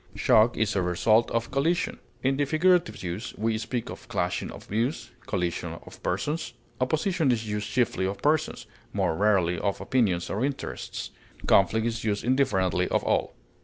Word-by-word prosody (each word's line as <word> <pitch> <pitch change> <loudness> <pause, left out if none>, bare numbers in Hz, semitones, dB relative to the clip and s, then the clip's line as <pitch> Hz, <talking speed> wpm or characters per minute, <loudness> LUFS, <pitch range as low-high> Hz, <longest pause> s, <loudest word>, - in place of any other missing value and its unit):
Shock 110 +2 +4
is 110 -1 +1
the 95 - +1
result 110 +6 +3
of 115 +2 -2
collision. 165 +6 0 0.2
In 135 +1 +2
the 145 +1 +1
figurative 170 - +2
use, 90 +6 -5
we 110 +1 0
speak 120 0 -3
of - - -10
clashing - - -1
of - - -9
views, 115 +8 -2 0.2
collision 85 -3 -2
of - - -13
persons. 145 - -2 0.3
Opposition 155 +3 +1
is 110 -2 -1
used 105 0 -3
chiefly 115 -6 +1
of 100 +1 -4
persons, 155 +1 0 0.3
more - - +1
rarely 95 -3 +2
of 100 -1 -1
opinions 100 -10 +1
or 105 +5 -1
interests; 140 0 -4 0.3
conflict 110 +4 +4
is 115 0 -2
used 105 -2 -1
indifferently 95 -9 +2
of - - 0
all. - - 0
110 Hz, 165 wpm, -27 LUFS, 95-135 Hz, 0.3 s, Shock